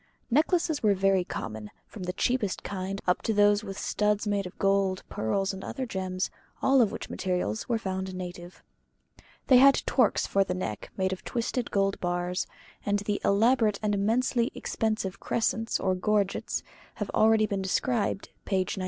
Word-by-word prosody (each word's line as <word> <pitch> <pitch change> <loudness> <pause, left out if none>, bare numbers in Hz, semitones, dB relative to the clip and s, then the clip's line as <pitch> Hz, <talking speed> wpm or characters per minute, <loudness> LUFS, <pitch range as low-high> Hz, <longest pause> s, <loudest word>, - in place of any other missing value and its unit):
Necklaces 320 +2 +2
were 210 -2 +4
very 195 -1 +3
common, 110 -9 -6 0.2
from 210 - -11
the 180 - -2
cheapest 220 -2 0
kind 195 0 -4
up 180 - +2
to 220 - -1
those 205 +1 +4
with 195 -2 -6
the - - -5
studs 210 0 +1
made 200 -2 0
of 180 - -13
gold, 195 -1 +1
pearls, 195 - -1
and 190 - -7
other 265 - -4
gems, 185 -4 -3 0.3
all 270 -1 +4
of 220 - +3
which - - -6
materials 180 - -2
were 235 - +2
found 190 -3 -4
native. 180 -1 -8 0.8
They 255 - +7
had 275 +2 +6
torques 250 -5 +2
for 195 - +2
the 180 -2 -3
neck 110 - -4
made 190 -1 +1
of 185 - -8
twisted 240 0 -2
gold 195 0 +1
bars; 175 +1 -1 0.4
and 205 0 +1
the 205 0 -2
elaborate 215 0 +3
and 210 -1 +1
immensely 235 +5 +1
expensive 215 -4 -2
crescents 225 0 0
or 190 -1 +1
gorgets 200 +1 0 0.3
have - - -4
been - - 0
already 220 0 +5
described 200 +2 -1
(p. 195 - -2
96). 190 +1 -1
200 Hz, 170 wpm, -28 LUFS, 185-220 Hz, 0.8 s, They